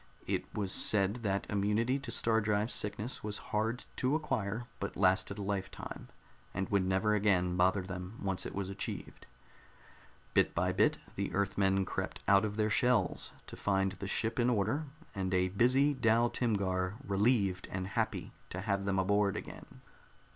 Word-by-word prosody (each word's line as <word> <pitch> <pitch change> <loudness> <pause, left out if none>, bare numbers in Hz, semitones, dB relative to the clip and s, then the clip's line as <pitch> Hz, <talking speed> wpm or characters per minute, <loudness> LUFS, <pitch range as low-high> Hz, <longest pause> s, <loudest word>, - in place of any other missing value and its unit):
It - - -2
was 100 -3 -1
said 100 +2 +3
that 100 -4 -1
immunity 105 +6 +1
to 135 - -7
star 115 -1 +2
drive 105 +1 +1
sickness 105 +4 -2
was 105 0 -2 0.2
hard 110 +4 0
to 130 +3 +2
acquire, 120 -7 -2
but 100 - -4
lasted 95 +1 +2
a 100 - -4
lifetime, 95 -1 -4 0.5
and 95 0 -1
would 100 -2 +2
never 95 +3 +2
again 95 -4 +2
bother 95 +2 +3
them 95 +3 -6
once 95 -2 -1
it - - -6
was 100 -1 -2
achieved. 100 - -6 1.1
Bit - - +3
by - - +2
bit - - +3 0.2
the - - -2
Earthmen 95 -1 +2
crept - - -4
out 100 +2 +5
of 105 0 -4
their 110 0 +1
shells, 120 -5 +2
to - - -9
find 95 -1 +1
the 100 0 -6
ship 115 +4 0
in 120 +1 +3
order 125 +7 +1 0.3
and 95 -2 -1
a 90 0 +2
busy 130 +8 +3
Dal 115 -2 +3
Timgar 95 -5 0
relieved 100 -2 +2
and 95 0 -3
happy - - -2 0.2
to 95 - -5
have 100 -1 -1
them 100 -1 +1
aboard 100 +1 +2
again. - - -9
100 Hz, 165 wpm, -33 LUFS, 95-110 Hz, 1.1 s, out